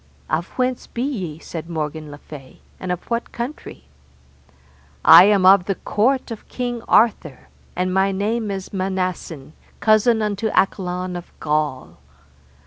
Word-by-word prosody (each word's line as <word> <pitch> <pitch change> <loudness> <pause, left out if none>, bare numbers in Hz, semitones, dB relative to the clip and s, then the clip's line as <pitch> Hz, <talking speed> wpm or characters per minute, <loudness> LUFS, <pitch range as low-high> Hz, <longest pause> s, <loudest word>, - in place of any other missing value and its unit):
Of 165 +3 0
whence 255 -1 -1
be 240 - -4
ye, 190 - -4
said 165 0 -8
Morgan 155 -1 -4
le 145 - -9
Fay, 145 -3 -13 0.2
and 185 - -4
of 180 - -3
what 235 0 -2
country? 240 - -7 1.2
I 180 - +10
am 200 -2 +3
of 190 -1 +7
the 195 - -1
court 250 +7 0
of 225 - -9
King 245 -2 -4
Arthur, 190 - +2 0.3
and 185 +1 -1
my 190 +1 +2
name 210 +3 -1
is 195 0 -6
Manassen, 185 -6 -3 0.3
cousin 215 +2 +3
unto 210 +1 -1
Accolon 180 -1 0
of 175 0 -8
Gaul. 150 - -2
190 Hz, 140 wpm, -21 LUFS, 165-220 Hz, 1.2 s, I